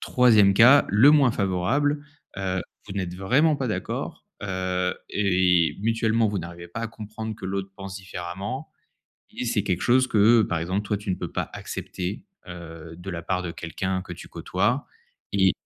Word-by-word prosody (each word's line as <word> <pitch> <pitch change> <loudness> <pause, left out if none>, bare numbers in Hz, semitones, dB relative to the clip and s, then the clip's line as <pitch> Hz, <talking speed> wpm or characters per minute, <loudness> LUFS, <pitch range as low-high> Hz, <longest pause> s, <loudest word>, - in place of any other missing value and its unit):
3e 110 -6 +5
cas, 125 +7 +7
le 110 +8 +7
moins 140 -5 +5
favorable, 120 +10 0 0.4
heu, 95 -1 -1 0.3
vous - - -5
n'êtes 95 -3 -3
vraiment 140 - +3
pas 130 -3 -2
d'accord, 90 -3 -4 0.2
heu, 90 -1 -1 0.2
et 90 -4 +2
mutuellement, 115 0 +2
vous 100 -1 -2
n'arrivez 85 0 -8
pas 115 +6 -6
à 115 - -3
comprendre 110 0 -7
que - - -10
l'autre 95 0 -3
pense 95 -1 -7
différemment 95 - -6 0.6
et - - -5
c'est 110 -3 +1
quelque 90 -2 -1
chose 130 +1 +4
que, 110 +2 +5
par 85 -4 -1
exemple, 95 +5 -1
toi 105 - 0
tu 105 -1 -5
ne - - +2
peux - - -5
pas - - -2
accepter, 95 - -5 0.2
heu, 85 -2 -9
de 90 +3 -10
la 85 -2 -5
part 90 +2 -1
de 85 - -4
quelqu'un 95 +3 -3
que 90 - -8
tu 85 - -11
côtoies 100 - -1 0.5
et - - +4
95 Hz, 175 wpm, -25 LUFS, 90-115 Hz, 0.6 s, cas